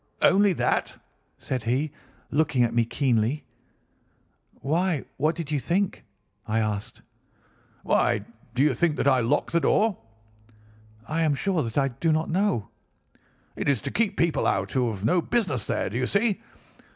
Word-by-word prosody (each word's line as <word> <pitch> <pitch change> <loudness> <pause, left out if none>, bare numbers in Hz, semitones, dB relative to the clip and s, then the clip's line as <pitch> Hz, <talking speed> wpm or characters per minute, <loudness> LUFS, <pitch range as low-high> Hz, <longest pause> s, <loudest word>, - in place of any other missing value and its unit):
"'Only 200 0 +5
that?' - - -1 0.4
said 130 -2 -3
he, 135 +6 0 0.4
looking 145 -4 +2
at 115 -1 0
me 120 -1 +3
keenly. 125 +2 0 1.1
"'Why, 165 +1 0
what 155 +4 +1
did 155 -3 -5
you 145 - +1
think?' 185 +7 -1 0.4
I 110 +1 0
asked. 105 -2 -3 0.8
"'Why - - +2 0.3
do 130 - +3
you 150 -2 +3
think 155 +4 +1
that - - 0
I 130 -2 +5
lock 125 +5 0
this 170 - +2
door?' 215 +3 +3 1.1
"'I 165 +1 -1
am 155 -3 +2
sure 185 +2 0
that 115 -1 -4
I 135 -1 +3
do 160 +6 -1
not 155 +1 0
know.' 185 - 0 0.9
"'It - - -1
is 140 -5 +2
to - - -3
keep 215 -3 0
people 170 -2 +1
out 95 0 0
who 125 -3 +1
have 100 -2 -5
no 170 +9 +3
business 165 - -1
there. - - -1
Do 120 - -2
you 125 - 0
see? 205 0 +1
145 Hz, 165 wpm, -26 LUFS, 120-170 Hz, 1.1 s, Only